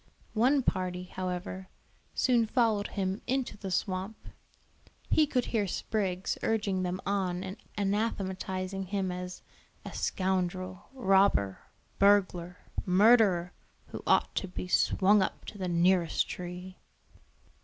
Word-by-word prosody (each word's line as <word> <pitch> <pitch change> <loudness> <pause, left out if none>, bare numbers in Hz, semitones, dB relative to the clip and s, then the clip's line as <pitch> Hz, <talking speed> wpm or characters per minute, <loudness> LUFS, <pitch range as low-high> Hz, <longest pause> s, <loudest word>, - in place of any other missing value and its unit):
One 260 +5 +3
party, 180 -4 -1
however, 185 0 -5 0.5
soon 240 -3 +3
followed 220 -4 +2
him 190 0 -2
into 265 0 -1
the 200 -2 -6
swamp. 190 +3 -3 0.8
He 310 -1 +5
could 250 -3 0
hear 210 -3 +2
Spriggs 190 -1 -2
urging 210 -4 0
them 180 0 -2
on 185 -2 -1
and 190 +2 -6 0.2
anathematizing 195 -2 -2
him 190 -1 -1
as 180 0 -6 0.4
"a - - -7
scoundrel, 185 -1 -2
robber, 195 - +3 0.4
burglar, 185 -3 +3 0.3
murderer, 195 -2 +4 0.4
who - - -7
ought - - +3
to 190 - 0
be 180 0 -6
swung 200 +3 +4
up - - -2
to 205 - -9
the 185 - -2
nearest 175 -1 +2
tree." 180 +1 -7
190 Hz, 120 wpm, -30 LUFS, 180-205 Hz, 0.8 s, He